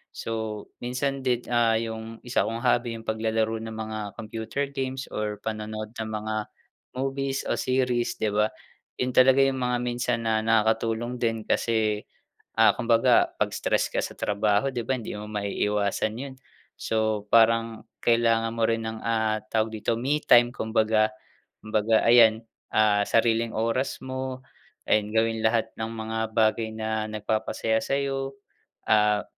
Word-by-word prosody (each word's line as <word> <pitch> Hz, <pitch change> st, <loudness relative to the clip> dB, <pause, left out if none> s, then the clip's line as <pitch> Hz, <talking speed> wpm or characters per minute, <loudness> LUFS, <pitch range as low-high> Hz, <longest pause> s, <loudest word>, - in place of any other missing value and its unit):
So 110 Hz, -2 st, -4 dB
minsan 135 Hz, +2 st, -2 dB
din, 125 Hz, -2 st, +1 dB
ah, 120 Hz, -2 st, +3 dB
yung 115 Hz, 0 st, -6 dB
1 120 Hz, -3 st, 0 dB
kong 115 Hz, +2 st, -3 dB
hobby 120 Hz, -1 st, +1 dB
yung 115 Hz, 0 st, -9 dB
paglalaro 110 Hz, 0 st, 0 dB
ng 110 Hz, 0 st, -6 dB
mga 110 Hz, 0 st, -5 dB, 0.2 s
computer 110 Hz, +5 st, -4 dB
games 135 Hz, -1 st, -4 dB
or 105 Hz, -1 st, -3 dB
panonood 110 Hz, 0 st, -5 dB
ng 110 Hz, 0 st, -4 dB
mga 110 Hz, 0 st, -3 dB, 0.6 s
movies 135 Hz, +1 st, -2 dB
o -, -, +1 dB
series 125 Hz, -2 st, 0 dB
'di 110 Hz, -, +2 dB
ba, 105 Hz, +1 st, +2 dB, 0.5 s
yun 125 Hz, 0 st, 0 dB
talaga 130 Hz, +2 st, +5 dB
yung 135 Hz, -1 st, +1 dB
mga 125 Hz, 0 st, 0 dB
minsan 120 Hz, -1 st, -1 dB
na 110 Hz, -1 st, +1 dB
nakakatulong 115 Hz, +2 st, +1 dB
din 115 Hz, -2 st, -1 dB
kasi, 110 Hz, -2 st, 0 dB, 0.5 s
ah, -, -, +6 dB
kumbaga 115 Hz, +1 st, +3 dB
pag -, -, 0 dB
stress -, -, 0 dB
ka -, -, +1 dB
sa -, -, -5 dB
trabaho 105 Hz, +5 st, +1 dB
'di 120 Hz, -2 st, -2 dB
ba, 130 Hz, -, +2 dB
hindi 115 Hz, -, -6 dB
mo 105 Hz, 0 st, -7 dB
maiiwasan 105 Hz, 0 st, -1 dB
yun. 135 Hz, +1 st, -6 dB, 0.5 s
So 110 Hz, -2 st, -1 dB
parang 115 Hz, 0 st, +3 dB, 0.2 s
kailangan 115 Hz, -1 st, +3 dB
mo 115 Hz, -, +1 dB
rin 115 Hz, 0 st, 0 dB
ng, 110 Hz, 0 st, -5 dB
ah, 110 Hz, -1 st, +1 dB
tawag 110 Hz, 0 st, +2 dB
dito 110 Hz, +1 st, -1 dB
me 140 Hz, +4 st, +1 dB
time 120 Hz, 0 st, +7 dB
kumbaga, 110 Hz, -2 st, +1 dB, 0.5 s
kumbaga 110 Hz, +1 st, +2 dB
ayan, 115 Hz, -1 st, +6 dB, 0.3 s
ah, 105 Hz, -1 st, +3 dB
sariling 115 Hz, 0 st, +2 dB
oras 115 Hz, +4 st, 0 dB
mo 130 Hz, 0 st, -5 dB, 0.4 s
ayun 105 Hz, 0 st, +2 dB
gawin 110 Hz, 0 st, +1 dB
lahat 110 Hz, 0 st, +2 dB
ng 110 Hz, 0 st, -4 dB
mga 110 Hz, 0 st, -3 dB
bagay 110 Hz, 0 st, +1 dB
na 110 Hz, 0 st, -2 dB
nagpapasaya 110 Hz, +1 st, -1 dB
sayo, 135 Hz, 0 st, -1 dB, 0.5 s
ah, 105 Hz, -1 st, +3 dB
115 Hz, 150 wpm, -26 LUFS, 110-120 Hz, 0.6 s, time